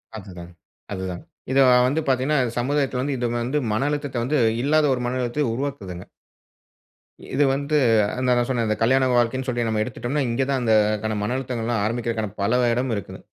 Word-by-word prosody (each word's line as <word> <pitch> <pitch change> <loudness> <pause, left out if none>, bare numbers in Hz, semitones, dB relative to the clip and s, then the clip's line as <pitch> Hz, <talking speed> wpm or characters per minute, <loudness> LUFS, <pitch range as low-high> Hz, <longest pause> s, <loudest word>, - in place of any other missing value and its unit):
அதுதாங், 90 -4 -10 0.4
அதுதாங். 95 -2 -5 0.3
இது 135 - +3 0.3
வந்து 150 +5 0
பார்த்தீங்கனா 135 +3 +1 0.2
சமுதாயத்துல 135 0 0
வந்து 140 +1 -1
இது 120 - -2 0.2
வந்து 130 +6 -1
மன 135 +7 0
அழுத்தத்த 145 -5 -2
வந்து, 145 +4 +1 0.2
இல்லாத 150 +2 +3
ஒரு 125 - -2
மன 125 +1 -2
அழுத்தத்த 125 +4 -1
உருவாக்குதுங்க. 110 -10 -5 1.3
இது 140 +3 +3
வந்து 140 +2 -1 0.5
நான் 120 -1 +2
சொன்னேன் 115 -4 0
கல்யாண 130 +3 +3
வாழ்க்கைனு 125 +2 +1
சொல்லி 120 -2 -1
நம்ம 110 -1 0
எடுத்துட்டோம்னா, 125 +5 -3
இங்கு 120 +3 0
தான் 135 -2 0
அந்த 110 -2 +2 0.3
கன 110 -1 -1
மன 120 +4 -1
அழுத்தங்கள் 125 -3 -4
எல்லாம் 115 -4 0
ஆரம்பிக்கிறதற்கான 115 -2 -2
பல 115 +5 +2
இடம் 125 +1 -1
இருக்குது. 100 - -7
125 Hz, 165 wpm, -23 LUFS, 115-135 Hz, 1.3 s, இது